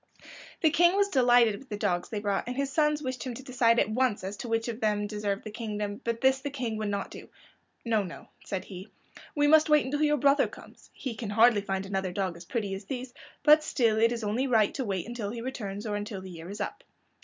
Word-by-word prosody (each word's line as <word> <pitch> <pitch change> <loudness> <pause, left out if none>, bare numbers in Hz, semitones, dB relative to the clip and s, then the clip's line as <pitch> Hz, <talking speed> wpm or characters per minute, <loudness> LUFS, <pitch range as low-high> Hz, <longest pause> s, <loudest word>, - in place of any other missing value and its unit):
The 315 - +4
King 345 +3 +4
was 400 0 +3
delighted 245 - +4
with 270 - -16
the 210 - -4
dogs 180 -4 -1
they 220 - -4
brought, 200 -1 -1
and 250 - -3
his 275 -1 -1
sons 300 -1 +2
wished 255 -1 -4
him 255 -3 -4
to 265 - -9
decide 245 -3 +2
at - - +3
once 245 -3 +1
as 195 +2 -4
to 240 - -6
which 225 0 0
of 230 -1 -4
them 210 -2 +1
deserved 205 -1 -3
the 215 - -7
kingdom, 210 -2 -4
but 230 0 -2
this 265 0 +4
the 285 +2 -4
King 250 -6 -3
would 215 -1 -2
not 200 -1 -3
do. - - -10 0.6
"No, 225 -2 +2
no," 180 -4 -8 0.2
said 190 -2 -4
he, 190 +1 -9 0.5
"we 290 -1 +3
must 310 +1 +5
wait 300 -3 +5
until 290 +3 -2
your 300 -1 +3
brother 280 +1 +4
comes. - - -15
He 260 -4 -5
can 220 -1 -6
hardly 220 0 +5
find 195 -1 -3
another 190 -1 -2
dog 185 -1 -2
as 170 +1 -11
pretty 205 -1 -3
as 195 +1 -6
these, 250 +1 -5 0.3
but 305 0 +7
still 230 -7 +1
it 230 +1 +4
is 235 -1 -3
only 225 +6 0
right 220 -5 +3
to 270 - -2
wait 195 -5 -3
until 235 -4 -4
he 235 +2 -5
returns, 215 -4 -5
or 210 -1 -2
until 205 -1 -4
the 185 0 -9
year 165 0 -9
is 205 +2 -7
up." - - -5
225 Hz, 245 wpm, -28 LUFS, 205-260 Hz, 0.6 s, but